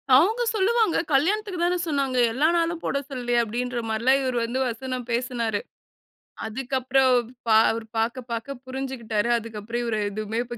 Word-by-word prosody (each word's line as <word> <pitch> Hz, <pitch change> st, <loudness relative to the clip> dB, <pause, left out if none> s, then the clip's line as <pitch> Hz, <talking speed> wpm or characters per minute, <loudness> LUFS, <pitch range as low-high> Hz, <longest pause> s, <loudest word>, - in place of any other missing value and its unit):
"அவுங்க 415 Hz, -, +4 dB
சொல்லுவாங்க, 435 Hz, -1 st, +2 dB, 0.2 s
கல்யாணத்துக்கு 380 Hz, +6 st, +1 dB
தான 355 Hz, +1 st, +2 dB
சொன்னாங்க. 275 Hz, -4 st, 0 dB, 0.2 s
எல்லா 290 Hz, +6 st, +3 dB
நாளும் 335 Hz, 0 st, 0 dB
போட -, -, 0 dB
சொல்லலையே!" 245 Hz, -3 st, 0 dB
அப்படின்ற 240 Hz, +2 st, -3 dB
மாரில்லாம் 240 Hz, +5 st, +3 dB
இவர் 255 Hz, -2 st, -1 dB
வந்து 240 Hz, +3 st, -2 dB
வசனம் 250 Hz, +1 st, -4 dB
பேசுனாரு. 235 Hz, -3 st, -1 dB, 0.9 s
அதுக்கு 245 Hz, +4 st, -4 dB
அப்புறம் 260 Hz, +1 st, +3 dB, 0.4 s
பா 220 Hz, -, +5 dB, 0.2 s
அவர் 225 Hz, 0 st, -4 dB
பாக்க 235 Hz, +3 st, 0 dB
பாக்க 230 Hz, +4 st, -4 dB
புருஞ்சுகிட்டாரு. 255 Hz, -4 st, -2 dB
அதுக்கு 225 Hz, -2 st, -6 dB
அப்புறம், 230 Hz, +3 st, -3 dB
இவர் 225 Hz, -2 st, -1 dB
எதுவுமே 215 Hz, +2 st, -3 dB
இப்ப 240 Hz, 0 st, -7 dB
250 Hz, 155 wpm, -25 LUFS, 230-275 Hz, 0.9 s, பா